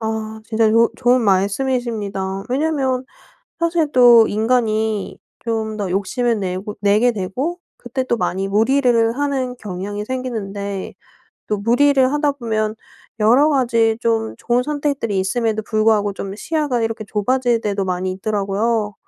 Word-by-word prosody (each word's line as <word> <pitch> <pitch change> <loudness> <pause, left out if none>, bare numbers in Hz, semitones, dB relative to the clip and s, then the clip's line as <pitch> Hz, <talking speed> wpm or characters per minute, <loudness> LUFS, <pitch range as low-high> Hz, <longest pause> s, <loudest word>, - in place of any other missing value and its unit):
아 220 0 -4
진짜 220 -1 +2
좋 230 +1 +4
좋은 250 0 +3
말씀이십니다. 200 -2 -1
왜냐하면 265 -2 0 0.6
사실 335 -3 +1
또 240 -3 +7
인간이 220 -2 0 0.3
좀 220 -2 -2
더 200 -3 -3
욕심을 225 +5 0
내고 190 +2 -4
내게 210 +4 +3
되고 250 - -3 0.2
그때 255 +2 -4
또 240 - 0
많이 195 -1 -1
무리를 230 +2 +2
하는 270 -3 -1
경향이 205 0 -5
생기는데 205 -6 -4 0.5
또 210 - -1
무리를 260 +5 +3
하다 295 -1 +1
보면 220 -5 -2 0.5
여러 245 +8 +5
가지 230 -5 +2
좀 225 -2 0
좋은 240 +1 0
선택들이 280 -8 -2
있음에도 220 +3 0
불구하고 215 -2 +1
좀 195 0 -6
시야가 290 -1 -1
이렇게 225 -1 -3
좁아질 240 +3 +1
때도 200 -2 -1
많이 185 0 -2
있더라고요. 210 +2 -1
225 Hz, 300 characters per minute, -19 LUFS, 205-255 Hz, 0.6 s, 또